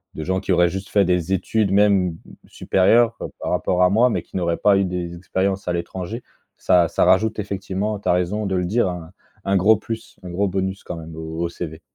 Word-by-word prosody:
de 80 Hz, -, -5 dB
gens 95 Hz, +2 st, -1 dB
qui 95 Hz, -, -3 dB
auraient 90 Hz, -1 st, +4 dB
juste 95 Hz, +3 st, -6 dB
fait 100 Hz, -2 st, +3 dB
des 90 Hz, 0 st, 0 dB
études, 100 Hz, +2 st, 0 dB
même, 100 Hz, -2 st, +4 dB
mmh, 80 Hz, -, -9 dB, 0.3 s
supérieures, 115 Hz, +5 st, +2 dB
heu, -, -, -3 dB
par -, -, -3 dB
rapport 90 Hz, 0 st, +1 dB
à 90 Hz, -, +5 dB
moi, 115 Hz, +5 st, +4 dB
mais -, -, -2 dB
qui -, -, -17 dB
n'auraient 85 Hz, -2 st, 0 dB
pas 100 Hz, -1 st, +4 dB
eu 100 Hz, -, +2 dB
des 90 Hz, -1 st, -4 dB
expériences 95 Hz, +2 st, -2 dB
à 90 Hz, -, 0 dB
l'étranger. 95 Hz, +6 st, -5 dB, 0.3 s
Ça 85 Hz, -2 st, +3 dB
ça -, -, +1 dB
rajoute 110 Hz, +4 st, +3 dB
effectivement, 100 Hz, +1 st, -3 dB
tu -, -, -3 dB
as -, -, +6 dB
raison 90 Hz, +4 st, -1 dB
de 95 Hz, -, -1 dB
le 90 Hz, -, 0 dB
dire, 105 Hz, +3 st, +1 dB
hein, 85 Hz, -1 st, -7 dB, 0.3 s
un 100 Hz, 0 st, +1 dB
gros 100 Hz, +4 st, +5 dB
plus, 115 Hz, +1 st, -7 dB
un 90 Hz, -, -7 dB
gros 100 Hz, +3 st, 0 dB
bonus 95 Hz, +1 st, -3 dB
quand 90 Hz, -, -6 dB
même 80 Hz, 0 st, -9 dB
au 80 Hz, 0 st, -7 dB
au -, -, 0 dB
CV. 80 Hz, -1 st, -7 dB
95 Hz, 235 wpm, -21 LUFS, 90-100 Hz, 0.3 s, as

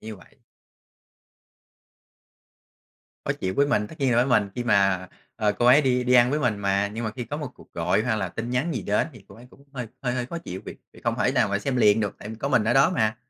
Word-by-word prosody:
như 110 Hz, -1 st, -8 dB
vậy. -, -, -20 dB, 2.9 s
Khó -, -, 0 dB
chịu 95 Hz, 0 st, -3 dB
với 140 Hz, 0 st, +2 dB
mình, 105 Hz, -7 st, +1 dB
tất 160 Hz, -, -12 dB
nhiên 135 Hz, -3 st, +2 dB
là -, -, +2 dB
với 120 Hz, -, +4 dB
mình 105 Hz, -6 st, +2 dB
khi 120 Hz, -, -2 dB
mà, 95 Hz, -4 st, +2 dB, 0.3 s
ờ 105 Hz, -2 st, +1 dB
cô 120 Hz, -, -1 dB
ấy 130 Hz, +5 st, +7 dB
đi 125 Hz, -2 st, +1 dB
đi 125 Hz, 0 st, +2 dB
ăn 120 Hz, 0 st, +6 dB
với 150 Hz, -, 0 dB
mình 120 Hz, -7 st, 0 dB
mà. 100 Hz, 0 st, +1 dB
Nhưng 115 Hz, +2 st, -4 dB
mà 110 Hz, -, -2 dB
khi 120 Hz, +3 st, -6 dB
có 145 Hz, +6 st, -5 dB
1 150 Hz, -, -4 dB
cuộc -, -, -19 dB
gọi 110 Hz, -, +1 dB
hay 110 Hz, -3 st, 0 dB
là 95 Hz, -3 st, -2 dB
tin 115 Hz, +7 st, -5 dB
nhắn 130 Hz, +7 st, -1 dB
gì 115 Hz, -, -2 dB
đến 105 Hz, +10 st, 0 dB
thì 110 Hz, -5 st, -15 dB
cô -, -, -14 dB
ấy 120 Hz, -, -14 dB
cũng 140 Hz, -, -20 dB
hơi 125 Hz, -3 st, -5 dB
hơi 125 Hz, -2 st, -1 dB
hơi 125 Hz, -1 st, -2 dB
khó 170 Hz, +7 st, -6 dB
chịu 95 Hz, -, -7 dB
vì -, -, -7 dB, 0.2 s
vì -, -, -16 dB
không -, -, -1 dB
thể -, -, +2 dB
nào -, -, +2 dB
mà 100 Hz, -, 0 dB
xem 130 Hz, +5 st, -2 dB
liền 105 Hz, -3 st, +4 dB
được, 105 Hz, -3 st, -2 dB
tại 105 Hz, -, -8 dB
vì 110 Hz, -, -6 dB
có 125 Hz, -, -3 dB
mình 125 Hz, -, +3 dB
ở 115 Hz, +2 st, +1 dB
đó 135 Hz, +1 st, +5 dB
mà. 110 Hz, -1 st, +1 dB
115 Hz, 270 wpm, -25 LUFS, 105-125 Hz, 2.9 s, ấy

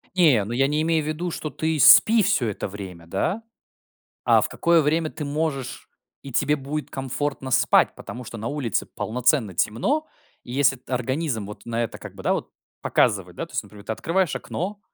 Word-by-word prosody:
Не, 150 Hz, -, +5 dB
ну 110 Hz, -, -6 dB
я 135 Hz, +3 st, +3 dB
не 150 Hz, +2 st, 0 dB
имею 160 Hz, -1 st, +1 dB
в -, -, -6 dB
виду, 165 Hz, +3 st, -3 dB
что 155 Hz, -, -4 dB
ты 160 Hz, +2 st, -2 dB
спи 220 Hz, -, +8 dB
всё 125 Hz, -9 st, +2 dB
это 105 Hz, -, -4 dB
время, 95 Hz, -4 st, -9 dB
да. 160 Hz, -, -1 dB, 0.8 s
А -, -, +5 dB
в -, -, -1 dB
какое 170 Hz, -1 st, +3 dB
время 155 Hz, +2 st, +1 dB
ты 150 Hz, -, -6 dB
можешь 145 Hz, -2 st, -3 dB, 0.3 s
и 135 Hz, -, -9 dB
тебе 145 Hz, +4 st, +2 dB
будет 145 Hz, +1 st, -5 dB
комфортно 135 Hz, 0 st, -3 dB
спать? 130 Hz, +1 st, +4 dB
Потому 125 Hz, +1 st, -8 dB
что 115 Hz, 0 st, -8 dB
на 110 Hz, +2 st, -4 dB
улице 130 Hz, -9 st, -1 dB
полноценно 120 Hz, -3 st, 0 dB
темно, 200 Hz, -, 0 dB, 0.4 s
и 120 Hz, -, -8 dB
если 135 Hz, 0 st, +3 dB
т 130 Hz, +1 st, -13 dB
организм 125 Hz, -2 st, -1 dB
вот 105 Hz, -, -10 dB
на 115 Hz, 0 st, -1 dB
это 115 Hz, -, -4 dB
как -, -, -10 dB
бы, -, -, -10 dB
да, -, -, +2 dB
вот -, -, -3 dB, 0.3 s
показывает, -, -, +1 dB
да -, -, -4 dB
то -, -, -19 dB
есть -, -, -1 dB
вот -, -, -16 dB
например, 100 Hz, -1 st, -13 dB
ты 110 Hz, -, -2 dB
открываешь 170 Hz, -, 0 dB
окно, 200 Hz, +4 st, -5 dB
135 Hz, 205 wpm, -24 LUFS, 115-160 Hz, 0.8 s, спи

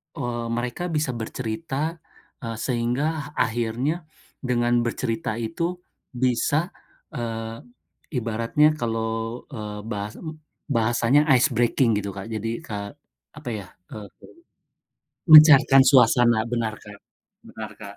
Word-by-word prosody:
eee, 120 Hz, -1 st, -3 dB
mereka 125 Hz, +8 st, -3 dB
bisa 150 Hz, -5 st, -1 dB
bercerita, 135 Hz, +8 st, -4 dB, 0.4 s
eee, 115 Hz, -3 st, -5 dB
sehingga 140 Hz, +5 st, -2 dB
akhirnya 120 Hz, +8 st, -1 dB, 0.3 s
dengan 120 Hz, -1 st, +1 dB
bercerita 115 Hz, -2 st, -2 dB
itu 120 Hz, +10 st, -3 dB, 0.4 s
bisa, 130 Hz, +7 st, +1 dB, 0.4 s
eee, 115 Hz, -4 st, -5 dB, 0.6 s
ibaratnya 115 Hz, +6 st, +1 dB
kalau, 115 Hz, 0 st, -3 dB
eee, 105 Hz, -3 st, -6 dB
bahas 105 Hz, -1 st, -4 dB, 0.6 s
bahasanya 120 Hz, +5 st, +2 dB
ice 125 Hz, +3 st, +3 dB
breaking 120 Hz, -1 st, +2 dB
gitu 100 Hz, -1 st, -6 dB
Kak, 100 Hz, +4 st, -7 dB
jadi 115 Hz, +1 st, -4 dB
ka 100 Hz, +3 st, -6 dB, 0.4 s
apa 150 Hz, -5 st, -7 dB
ya, 100 Hz, -4 st, -6 dB, 0.2 s
eee, 105 Hz, -2 st, -8 dB, 1.3 s
mencairkan 145 Hz, -3 st, +9 dB
suasana 120 Hz, -4 st, +4 dB
benar 115 Hz, -3 st, -1 dB
Kak 105 Hz, -1 st, -14 dB, 0.5 s
benar 110 Hz, -2 st, -8 dB
Kak, 100 Hz, -1 st, -10 dB
120 Hz, 105 wpm, -24 LUFS, 110-135 Hz, 1.3 s, mencairkan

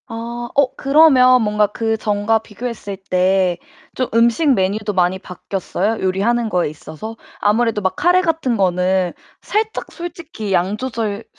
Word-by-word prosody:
아. 235 Hz, 0 st, -6 dB
어 275 Hz, -1 st, +2 dB
그러면 270 Hz, -4 st, +5 dB
뭔가 210 Hz, 0 st, +2 dB
그 225 Hz, +2 st, -1 dB
전과 210 Hz, +1 st, +1 dB
비교했을 220 Hz, -2 st, -7 dB
때 185 Hz, -1 st, +2 dB, 0.4 s
좀 255 Hz, -, -1 dB
음식 235 Hz, +7 st, +3 dB
메뉴도 205 Hz, +1 st, -1 dB
많이 185 Hz, 0 st, +1 dB
바뀌었어요, 195 Hz, +3 st, -3 dB
요리하는 205 Hz, +6 st, +1 dB
거에 180 Hz, -7 st, 0 dB
있어서? 160 Hz, +9 st, -9 dB, 0.2 s
아무래도 220 Hz, +1 st, +1 dB
막 190 Hz, -1 st, -1 dB
카레 355 Hz, +5 st, +4 dB
같은 320 Hz, -8 st, 0 dB
거는 185 Hz, -1 st, +1 dB, 0.3 s
살짝 440 Hz, +1 st, -2 dB
솔직히 325 Hz, -, -6 dB
양 185 Hz, +3 st, +1 dB
조절 225 Hz, -4 st, -3 dB
220 Hz, 295 characters per minute, -19 LUFS, 190-250 Hz, 0.4 s, 그러면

